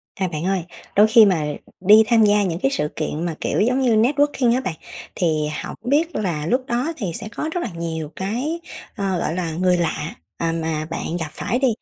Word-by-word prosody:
À, 190 - -1
bạn 160 -1 -4
ơi, 190 -2 0 0.3
đôi 210 +2 +7
khi 220 0 +7
mà 175 -6 +2 0.3
đi 210 +4 +7
tham 230 -2 +5
gia 205 0 +4
những 175 -3 -2
cái 270 - +1
sự 150 - 0
kiện 155 +1 -3
mà, 165 -3 -2
kiểu, - - 0
giống 250 +4 +2
như 240 -4 +3
networking 260 +1 +3
á, 255 - +1
bạn 185 -10 -3 0.4
thì 155 -4 +1 0.2
hổng - - -6
biết 305 +6 +1
là 170 -8 -1
lúc 255 +9 +1
đó 250 +8 -1
thì 210 - -3
sẽ 220 +5 -5
có 310 - -2
rất 355 - -1
là - - -3
nhiều 160 -2 -4
cái, 245 - -2 0.4
ờ, 195 -4 -1
gọi - - -1
là, 175 -3 -2
người 180 +2 +2
lạ, 165 -2 -2 0.2
à, 165 -1 0
mà 160 -2 -2
bạn 165 +1 -4
gặp 160 -2 -3
phải 240 +9 -2
đi, 270 - +3
195 Hz, 225 wpm, -21 LUFS, 165-240 Hz, 0.4 s, đôi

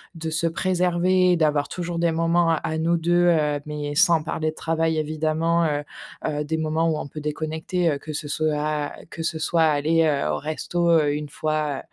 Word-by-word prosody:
de 160 0 -4
se 165 +1 0
préserver, 180 +1 +2
d'avoir 150 -3 +1
toujours 175 -1 -4
des 170 -1 +2
moments 165 +1 +2
à 160 0 -1
nous 165 +2 +1
2 175 +1 +2
heu, 150 -4 +2
mais 150 -1 -4
sans 165 -2 +4
parler 155 0 -2
de - - -17
travail, 160 0 0
évidemment». 155 +2 0
Heu-heu, 150 0 -4
des 160 +2 -2
moments 160 +1 0
où 155 - 0
on - - -5
peut 155 - -7
déconnecter, 160 +3 -2
heu, 140 - -1
que 155 +2 -8
ce 145 0 -4
soit 155 0 0
à 150 -1 -2 0.2
que 165 - -6
ce 160 -1 -2
soit 165 +1 +2
aller, 155 +2 +3
heu, 145 - +1
au 75 - 0
resto, 170 +2 -2
heu, 155 -3 +4
1 150 0 -4
fois, 150 -1 -2
160 Hz, 195 wpm, -23 LUFS, 150-170 Hz, 0.2 s, sans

